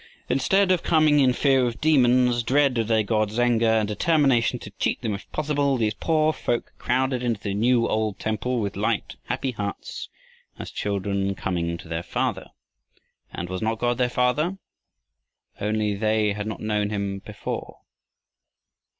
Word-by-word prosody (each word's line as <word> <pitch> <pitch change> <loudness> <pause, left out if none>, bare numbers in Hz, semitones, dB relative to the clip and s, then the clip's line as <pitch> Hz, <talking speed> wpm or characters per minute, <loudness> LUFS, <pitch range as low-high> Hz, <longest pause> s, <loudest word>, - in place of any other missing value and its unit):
Instead 185 +10 +3
of 180 - +2
coming 155 -3 +4
in 130 -2 +5
fear 135 +1 +3
of 115 - -5
demons, 125 -5 +4
dread 135 +2 +2
of 110 - 0
their 110 -1 +2
gods' 110 +1 0
anger, 120 -2 +3
and 110 -1 +2
determination 130 0 +2
to 105 - -10
cheat - - 0
them 110 -3 -1
if 100 - -8
possible, 145 -3 0
these 110 -3 0
poor 155 +5 +1
folk 120 -5 -2
crowded 130 0 0
into 120 -4 -1
the 100 -1 -3
new 115 +3 +2
old 110 -2 -1
temple 115 +3 -2
with 100 -2 -3
light, - - -1
happy 135 - -2
hearts, 105 -4 -5 0.5
as - - -7
children 100 -1 -2
coming 85 -3 -2
to 90 +1 -12
their 80 0 -3
Father. - - -2 0.8
And 90 - -5
was 95 0 -4
not 110 +1 0
God 120 +1 0
their 125 -1 +2
Father, 145 +10 +1 1.0
only 105 0 0
they 110 0 +1
had 105 +1 -4
not 110 - -5
known 105 -1 0
him 100 -2 -3
before? - - -6
115 Hz, 160 wpm, -24 LUFS, 105-130 Hz, 1.0 s, in